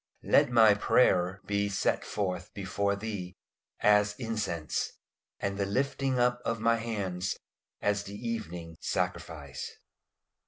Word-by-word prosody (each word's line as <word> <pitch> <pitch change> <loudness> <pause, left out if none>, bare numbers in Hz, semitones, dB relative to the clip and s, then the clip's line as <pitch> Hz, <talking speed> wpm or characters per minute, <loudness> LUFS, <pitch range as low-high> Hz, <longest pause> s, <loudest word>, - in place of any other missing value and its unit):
"LET - - +5
MY 115 -3 +7
PRAYER 95 -3 +3
BE 100 0 0
SET 100 - +1
FORTH 90 -3 -3
BEFORE 100 +1 0
THEE 100 -4 -5 0.5
AS 105 0 +4
INCENSE: 110 - -2 0.5
AND 100 0 -2
THE 100 - +1
LIFTING 135 +3 0
UP 125 0 +2
OF 115 0 -1
MY 115 +1 +3
HANDS 100 -6 -2 0.5
AS 105 0 +1
THE 100 - -7
EVENING 90 -8 -5
SACRIFICE." 70 -5 -3
100 Hz, 120 wpm, -30 LUFS, 90-115 Hz, 0.5 s, MY